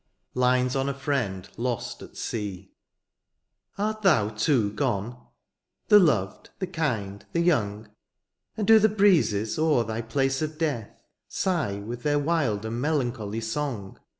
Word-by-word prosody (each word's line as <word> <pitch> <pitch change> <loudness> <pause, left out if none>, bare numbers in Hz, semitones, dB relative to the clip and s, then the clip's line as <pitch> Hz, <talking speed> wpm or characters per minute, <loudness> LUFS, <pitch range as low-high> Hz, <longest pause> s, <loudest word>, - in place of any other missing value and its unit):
LINES 125 0 +2
ON 135 +1 0
A 140 - -3
FRIEND 120 -10 -2
LOST 120 -1 -3
AT - - -12
SEA. 100 -4 -5 1.1
Art 215 +2 -2
thou 155 - +4
too 110 0 +1
gone? 105 +4 -2 0.6
the 210 - +9
loved, 110 - +1
the 190 - -2
kind, 120 - -3
the 170 - +1
young 110 -12 +1
• - - -20 0.7
And 215 - -1
do 225 +1 +7
the 220 +1 +4
breezes 165 - +2
o^er 155 -7 +3
thy 110 +1 -3
place 135 +4 0
of 155 0 -3
death 145 -10 -3 0.2
Sigh 170 - -1
with 120 +3 -6
their 145 +1 +1
wild 145 -9 0
and 115 +2 -3
melancholy 120 -8 -1
song. 115 -4 -4
125 Hz, 145 wpm, -26 LUFS, 105-155 Hz, 1.1 s, the